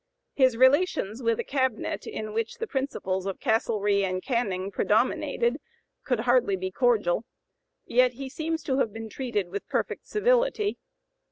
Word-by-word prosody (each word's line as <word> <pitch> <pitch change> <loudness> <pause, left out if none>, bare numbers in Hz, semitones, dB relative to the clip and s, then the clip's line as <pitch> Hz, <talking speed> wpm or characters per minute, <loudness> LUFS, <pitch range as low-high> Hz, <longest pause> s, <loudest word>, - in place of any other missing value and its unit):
His 260 -4 +3
relations 260 - +3
with 230 -2 +1
a - - 0
cabinet 260 -4 -1
in 215 -1 -5
which 225 0 -2
the 455 - -4
principles 195 - -2
of 195 - -4
Castlereagh 210 -3 +1
and 185 -1 -2
Canning 200 -6 -1
predominated 240 +5 +1 0.4
could 250 -4 0
hardly 245 -4 +3
be 185 0 -4
cordial, 225 -5 +2 0.6
yet 250 +1 +3
he 270 +2 -6
seems 320 +4 -3
to 265 -1 0
have 230 - +1
been 225 +1 -7
treated 215 -6 -2
with 200 +2 -6
perfect - - -2
civility. 475 -1 +1
235 Hz, 150 wpm, -27 LUFS, 205-265 Hz, 0.6 s, His